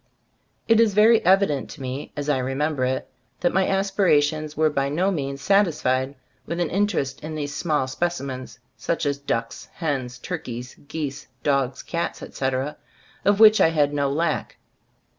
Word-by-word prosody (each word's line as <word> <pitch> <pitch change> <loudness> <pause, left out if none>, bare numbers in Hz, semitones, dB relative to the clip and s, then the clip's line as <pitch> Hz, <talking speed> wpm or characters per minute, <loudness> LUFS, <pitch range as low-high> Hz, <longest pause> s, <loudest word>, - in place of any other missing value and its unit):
It 225 -1 +5
is 220 -4 +4
very 220 +2 +6
evident 185 -6 +3
to 150 - -10
me, 130 +2 -5
as 145 0 -3
I 145 -3 +2
re 130 +1 -2
member 150 -2 0
it, 130 +1 -2 0.3
that 175 - +2
my 190 0 +2
aspirations 155 -6 +1
were 155 0 +3
by 140 -1 0
no 180 +7 +1
means 140 -5 -3
satisfied 145 -8 +2 0.3
with 170 +1 -3
an 175 - 0
interest 170 -9 -1
in 155 0 -5
these 145 -1 -4
small 150 -5 0
specimens, 130 -3 -3 0.2
such 170 -1 -2
as 140 -1 0
ducks, 115 -5 -3
hens, 130 -6 -2
turkeys, 125 0 -6
geese, 150 -2 -5 0.2
dogs, 135 -3 0
cats, 170 0 -3
etc., 135 +2 -2 0.5
of 205 0 +3
which 220 -1 +8
I - - +6
had 150 -3 +1
no 140 -1 0
lack. 160 +2 -1
150 Hz, 160 wpm, -24 LUFS, 135-175 Hz, 0.5 s, which